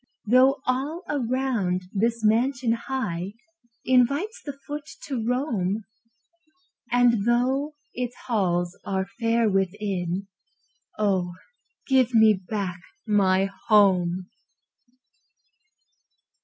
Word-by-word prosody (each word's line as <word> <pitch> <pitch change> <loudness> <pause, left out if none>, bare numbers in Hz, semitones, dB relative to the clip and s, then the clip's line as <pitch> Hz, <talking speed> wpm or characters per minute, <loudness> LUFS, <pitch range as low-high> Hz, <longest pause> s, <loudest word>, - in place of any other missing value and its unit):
Though 255 +5 +4
all 280 +7 -1
around 245 -9 -1
this 230 +2 0
mansion 240 +3 +2
high 225 -7 -3 0.5
Invites 280 - +2
the 285 -2 -7
foot 295 0 -6
to 260 -6 -3
roam, 225 -5 -1 1.1
And 240 -3 +4
though 265 +5 +1 0.2
its 245 0 -4
halls 175 -6 0
are 190 -1 -1
fair 230 0 +2
within 195 -2 -1 0.7
Oh, 190 -4 0 0.5
give 255 -3 +3
me 220 -1 +7
back 190 -2 -4 0.3
my 195 -2 +2 0.2
HOME! 185 -4 +3
225 Hz, 90 wpm, -25 LUFS, 195-255 Hz, 1.1 s, me